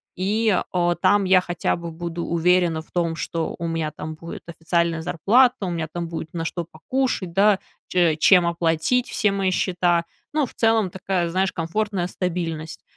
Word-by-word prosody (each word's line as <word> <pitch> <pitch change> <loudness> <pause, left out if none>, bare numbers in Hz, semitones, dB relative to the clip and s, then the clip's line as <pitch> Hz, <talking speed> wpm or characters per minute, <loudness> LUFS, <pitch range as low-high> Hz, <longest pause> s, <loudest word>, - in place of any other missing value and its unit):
и, 210 +2 +1
а, 175 -1 +1
там 205 +3 +3
я 185 -1 +5
хотя 175 -1 -1
бы 170 -1 -6
буду 170 +1 -5
уверена 170 -1 +2
в - - -29
том, 170 -2 0
что 165 0 -3
у 170 - -3
меня 165 -2 -2
там 155 +1 -7
будет 165 +2 -9
официальная 170 0 -1
зарплата, 215 - +3
у 180 - -2
меня 165 -2 -2
там 175 -1 -4
будет 165 -1 -6
на 165 -1 -3
что 170 +1 -3
покушать, 185 +2 -2
да, 200 +2 +4 0.3
че 175 -3 +2
чем 180 +2 +5
оплатить 170 +8 +1
все 210 - +1
мои 195 -1 0
счета. 175 -2 +1 0.3
Ну, 305 -2 +2
в - - -13
целом, 225 -5 +2
такая, 185 -2 -1
знаешь, 185 +2 0
комфортная 185 +2 -2
стабильность. 165 -4 -4
175 Hz, 175 wpm, -23 LUFS, 165-190 Hz, 0.3 s, я